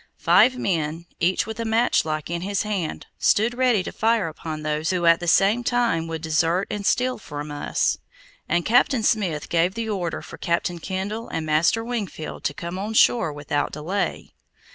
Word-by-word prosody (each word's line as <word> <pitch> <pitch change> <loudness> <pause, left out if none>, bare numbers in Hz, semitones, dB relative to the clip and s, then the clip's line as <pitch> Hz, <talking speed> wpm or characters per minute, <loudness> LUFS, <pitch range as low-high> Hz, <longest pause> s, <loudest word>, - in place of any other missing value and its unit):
Five 255 0 +4
men, 165 -6 -2
each 180 +2 +2
with 220 +1 -7
a - - -1
matchlock 220 -9 +1
in 170 0 -2
his 200 +3 -1
hand, 200 -7 -3
stood 225 +3 +3
ready 245 -6 +2
to - - -5
fire 225 -4 +1
upon 155 0 -6
those 155 +1 -1
who 180 -2 0
would 170 -1 +7
at 165 - +1
the 175 - -5
same 205 +8 +4
time 235 -10 +1
desert 165 +3 0
and 205 - -3
steal 250 +4 +1
from 150 -5 -7
us, 145 0 0 0.5
and 175 +1 +1
Captain 245 +1 +3
Smith 185 -10 0
gave 175 +3 +1
the 225 -1 -3
order 180 -5 -3
for - - -11
Captain 170 +1 -1
Kendall 195 +6 -4
and 160 - -3
Master 160 +9 +2
Wingfield 215 -10 -5
to 145 - 0
come 170 +2 -5
on 215 +3 -4
shore 195 -8 +4
without 145 0 -2
delay. 170 +7 -3
180 Hz, 180 wpm, -23 LUFS, 160-220 Hz, 0.5 s, would